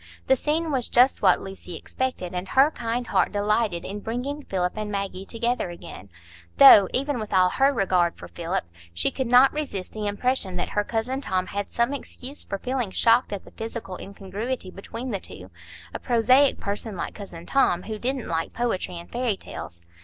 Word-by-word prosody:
The 265 - +5
scene 310 +4 -1
was 255 -4 0
just 250 +2 +4
what 185 -3 +4
Lucy 190 -2 -8
expected, 220 -2 -4
and 180 +1 -3
her 275 +7 +5
kind 240 -2 -3
heart - - +1
delighted 205 -3 0
in 205 +2 -5
bringing 250 +7 -4
Philip 180 -8 -1
and 215 -1 -4
Maggie 195 -1 -4
together 235 -3 -1
again; 135 - -10 0.5
though, 195 - +10
even 275 0 0
with 215 -1 -6
all 185 -1 +5
her 270 +8 +3
regard 185 -8 +1
for - - -10
Philip, 170 +2 -3 0.3
she 85 - +1
could 260 - -2
not 250 +3 +6
resist 235 -12 -4
the 215 -1 -4
impression 205 -2 -1
that 175 - -2
her 205 - +1
cousin 240 +5 -2
Tom 185 -6 -1
had 200 +1 -4
some 235 +4 0
excuse 275 0 -6
for 195 - -4
feeling 250 0 -2
shocked 230 +5 +3
at 200 -2 -5
the - - -14
physical 225 -4 -6
incongruity 200 +2 -5
between 230 +6 -6
the 200 - -2
two,—a 90 - -11
prosaic 255 +4 +4
person 205 0 -4
like - - -4
cousin 175 -5 -9
Tom, 180 -10 +2
who 215 0 -5
didn't 255 0 -2
like 165 0 -2
poetry 210 -7 -2
and 170 - -10
fairy 240 -4 0
tales. 85 - -9
210 Hz, 185 wpm, -25 LUFS, 185-250 Hz, 0.5 s, though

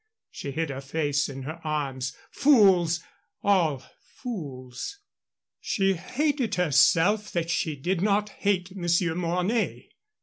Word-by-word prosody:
She 140 - -6
hid 160 +2 -2
her 135 0 -5
face 145 0 -1
in 135 -1 -7
her 160 +5 -7
arms. 135 -4 -3
Fools! 190 - +4 0.4
all 165 -10 +2 0.3
fools! 145 - -6 0.6
She 195 -3 +1
hated 250 - -1
herself 180 +6 +3
that 170 -1 -1
she 160 -2 0
did 175 +6 -1
not 205 +1 +2
hate 195 -2 -1
Monsieur 175 -2 +1
Mornay. 180 +6 -1
170 Hz, 115 wpm, -26 LUFS, 145-200 Hz, 0.6 s, Fools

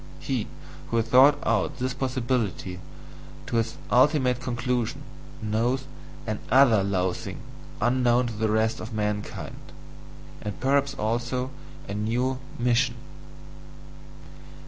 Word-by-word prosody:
He - - -2 0.4
who 115 - 0
has 115 - +2
thought 135 +4 +7
out 145 - +1
this 130 -1 -1
possibility 125 -8 -1 0.7
to 115 +8 +1
its 115 0 -2
ultimate 130 -1 +4
conclusion 125 -1 -1 0.4
knows 115 +5 +1 0.4
ANOTHER 110 +1 +4
loathing 95 -2 -1 0.4
unknown 125 +1 +3
to 120 - -3
the 110 0 0
rest 110 +1 +1
of 115 +2 -7
mankind 105 -1 -3 0.8
and 105 -1 -5
perhaps 140 +1 +2
also 120 +3 -1 0.4
a 100 - -4
new 120 +5 0 0.2
MISSION! 120 0 +2
120 Hz, 105 wpm, -26 LUFS, 110-130 Hz, 0.8 s, thought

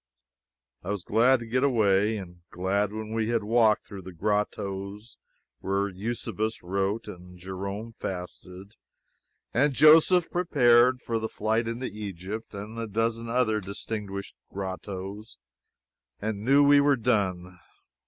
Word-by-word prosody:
I 90 - -8
was 100 -3 -2
glad 120 +4 +3
to - - -6
get 125 +3 0
away, 110 -5 +3
and 90 -3 -9
glad 100 +3 -1
when 110 0 -6
we 115 0 0
had 115 -2 +1
walked 110 0 +3
through 100 -2 -9
the 95 - -9
grottoes 100 +2 -3 0.4
where 100 +1 -1
Eusebius 110 +2 -4
wrote, 100 +4 -1
and 90 0 -11
Jerome 100 +5 -6
fasted, 95 +2 -8 0.8
and 140 +4 +3
Joseph 165 +4 +6
prepared 125 -7 +4
for 115 -1 -1
the 110 0 -3
flight 110 +2 -1
into 115 +3 -3
Egypt, 105 0 -6
and 105 +3 -7
the 115 - -3
dozen 115 +2 -1
other 115 -3 +1
distinguished 100 0 -6 0.2
grottoes, 95 +2 -6 0.8
and 105 -1 -3
knew 140 +4 +5
we 145 0 +6
were 140 0 +4
done. 95 -6 -1
105 Hz, 135 wpm, -27 LUFS, 95-115 Hz, 0.8 s, Joseph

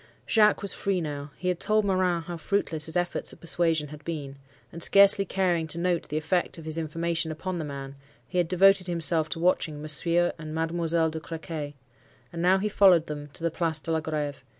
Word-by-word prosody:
"Jacques 210 -2 +3
was 200 - +3
free 195 -2 -1
now. 145 -3 -5
He 180 - -5
had 180 -2 0
told 215 0 +1
Morin 185 -3 +1
how 175 +1 -6
fruitless 165 -3 -1
his 160 - -3
efforts 175 0 -2
at - - -15
persuasion 165 -3 +2
had 150 0 -11
been; 145 -4 -6 0.3
and 170 - -9
scarcely 200 +2 +6
caring 175 -4 0
to 160 - -6
note 175 0 -1
the 150 - -2
effect 175 +4 -1
of 165 - -10
his 160 +1 -2
information 165 +1 -2
upon 175 +3 -5
the 160 - -4
man, 140 -1 -7 0.3
he 180 - -2
had 175 - +1
devoted 190 +1 +4
himself 165 -2 +1
to - - -4
watching 165 -3 0
Monsieur 170 +3 +2
and 155 -1 -7
Mademoiselle 165 0 +1
de 160 - -5
Crequy. 160 -2 -7 0.6
And 170 - -4
now 185 +2 +4
he 200 +2 -1
followed 190 -5 +5
them 145 -1 -7
to - - -8
the 165 - 0
Place 160 -1 -1
de 160 +3 +2
la 160 - +1
Greve. 150 -3 -4
165 Hz, 210 wpm, -26 LUFS, 155-180 Hz, 0.6 s, scarcely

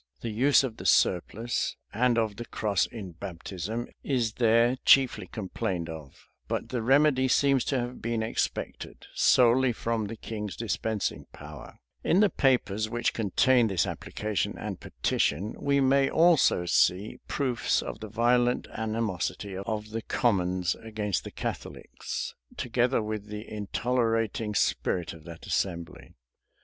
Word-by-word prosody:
[*] - - -40
The 115 - -3
use 135 +6 +4
of 120 -4 -4
the - - -9
surplice, 110 +7 +1 0.2
and 120 +2 +2
of 110 -3 0
the 120 - -6
cross 100 -6 0
in 100 -6 -8
baptism 95 +7 -5 0.2
is 120 -6 0
there 115 +2 +3
chiefly 135 -2 +4
complained 95 -5 -3
of; 80 -4 -10 0.2
but - - -3
the 125 -2 -2
remedy 135 +2 +4
seems 135 0 +3
to 135 - 0
have 120 +1 -5
been 115 -1 -1
expected 110 - -3
solely 125 +1 +4
from 115 -2 -2
the 115 - -6
king's 105 -2 -6
dispensing 110 -2 -2
power,[] 75 -1 -11 0.3
In 180 - +3
the 210 -1 +4
papers 110 -6 +1
which 120 +1 0
contain 115 +3 +3
this 95 -6 +1
application 105 -1 -3
and - - -5
petition, 95 +10 -1
we 140 0 +2
may 135 0 +3
also 165 - +4
see 90 +4 +2
proofs 130 -5 0
of - - -6
the 110 -1 -7
violent 120 +3 +2
animosity 110 -3 -2
of 105 +2 -4
the 115 +1 -3
commons 90 -7 +1
against 105 -5 -2
the - - -7
Catholics, - - -5 0.2
together 125 0 +1
with 105 -1 -4
the 105 +1 -7
intolerating 115 0 -1
spirit 90 -2 0
of 80 -2 -14
that 85 -1 -10
assembly. 85 -4 -3
110 Hz, 140 wpm, -28 LUFS, 100-125 Hz, 0.3 s, use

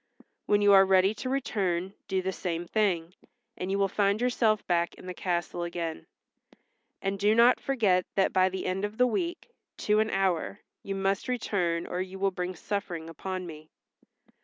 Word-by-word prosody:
When 205 0 +3
you 205 0 +6
are 195 0 +8
ready 190 +1 +4
to 255 +4 -5
return 195 -9 -1
do 190 -2 -1
the 190 - -1
same 175 -2 -3
thing, 180 -4 0 0.4
and 180 - -4
you 195 - 0
will 200 0 +2
find 200 +1 +1
yourself 230 -3 +1
back 170 -1 0
in - - -13
the 180 - -5
castle 175 -1 -2
again. 170 -2 -4 1.0
And 195 0 -1
do 210 +2 +3
not 235 +2 +6
forget 205 -9 +1
that 195 - +2
by 185 0 +4
the 190 0 -5
end 185 +2 -1
of 205 +2 -4
a 250 - +6
week, 340 - -2 0.3
to 210 0 +4
an 220 0 +2
hour, 195 0 0 0.2
you 195 - -4
must 195 +3 -1
return 180 -9 -1
or 180 - -3
you 190 +1 -6
will 195 0 +1
bring 180 0 -4
suffering 170 -4 -4
upon 185 +3 -5
me." 155 -2 -10
190 Hz, 185 wpm, -28 LUFS, 180-205 Hz, 1.0 s, are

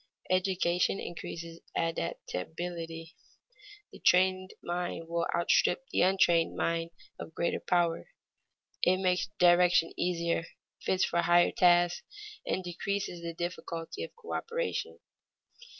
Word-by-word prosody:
Education 185 0 +1
increases 170 -1 -7 0.2
adaptability; 165 - -4 0.8
the - - -13
trained 185 +1 +3
mind 175 -1 -3
will 170 0 -1
outstrip 175 +7 +2
the - - +2
untrained 175 -3 +3
mind 165 0 0 0.3
of 160 - -8
greater 170 - 0
power. 170 -2 +1 0.7
It 185 +1 +4
makes 180 -1 +1
direction 175 -1 +5
easier, 170 -1 0 0.4
fits 190 0 +2
for 170 - +1
higher 175 0 +4
tasks, 175 -1 +4 0.5
and 185 - -1
decreases 180 0 -3
the 170 -1 -5
difficulty 170 - -5
of 485 - -5
coöperation. 475 +1 -4
175 Hz, 105 wpm, -30 LUFS, 170-185 Hz, 0.8 s, direction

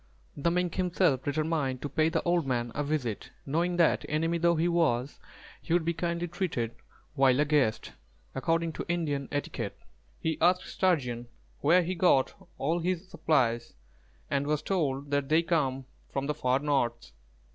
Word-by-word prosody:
The 145 +4 +1
Mink 180 0 0
himself 180 -7 +1
determined 145 -3 -1
to - - -1
pay 155 +3 +2
the 165 -1 -1
old 170 -4 +1
man 120 -2 -1
a 145 - -1
visit, 140 -8 -2 0.2
knowing 170 +5 0
that 170 -2 +3
enemy 165 +2 0
though 170 0 +3
he 165 +2 +1
was, 145 -7 +1 0.4
he 165 - -2
would 170 -2 +2
be 170 - +1
kindly 170 +1 -2
treated 155 - -2 0.4
while 135 -2 +4
a 150 - +4
guest, 145 -7 +1 0.4
according 165 +4 0
to - - -5
Indian 150 -6 -1
etiquette. 130 -7 -3 0.4
He 160 -1 -2
asked 180 +2 +4
Sturgeon 125 -10 0 0.3
where 175 +5 +4
he 180 +2 -2
got 165 -7 +3 0.2
all 160 +5 0
his 180 +1 -2
supplies, 120 -10 +1 0.5
and 140 +1 -1
was 150 -1 0
told 145 -7 -1
that 140 -1 0
they 160 +2 +4
came 135 -6 0 0.3
from 135 0 -2
the 150 - 0
far 130 -2 +1
north. 130 -6 -1
155 Hz, 165 wpm, -29 LUFS, 135-170 Hz, 0.5 s, while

